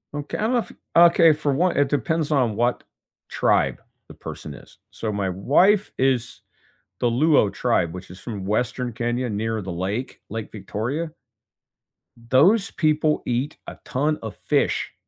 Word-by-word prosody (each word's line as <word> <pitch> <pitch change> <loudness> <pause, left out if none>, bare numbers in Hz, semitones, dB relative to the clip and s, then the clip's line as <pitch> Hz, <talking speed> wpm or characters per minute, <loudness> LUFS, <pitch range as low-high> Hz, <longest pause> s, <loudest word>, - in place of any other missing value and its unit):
Okay, 145 0 -4
I 215 - -1
love 240 0 0 0.2
okay, 170 -1 +7
for 150 -2 -1
one, 175 +6 +1
it 140 -1 +2
depends 150 +3 0
on 125 -7 +2
what 120 +2 0 0.5
tribe - - +1 0.3
the - - -12
person - - -8
is. - - -15
So, 110 - -4
my 100 -2 -1
wife 175 - +3
is 130 -3 0 0.6
the 120 - +2
Luo 125 -3 +3
tribe, 90 -9 0
which 90 -1 -9
is 90 - -11
from 100 -3 -6
Western 120 +4 -1
Kenya 120 +2 -2
near 110 +1 -2
the 95 - -5
lake, 95 +9 -4
Lake 110 +1 -5
Victoria. 115 - -4 1.2
Those 190 - +4
people 155 -1 +1
eat 125 +5 -2
a - - -9
ton 150 +4 0
of 110 -3 -6
fish - - 0
125 Hz, 150 wpm, -23 LUFS, 110-155 Hz, 1.2 s, okay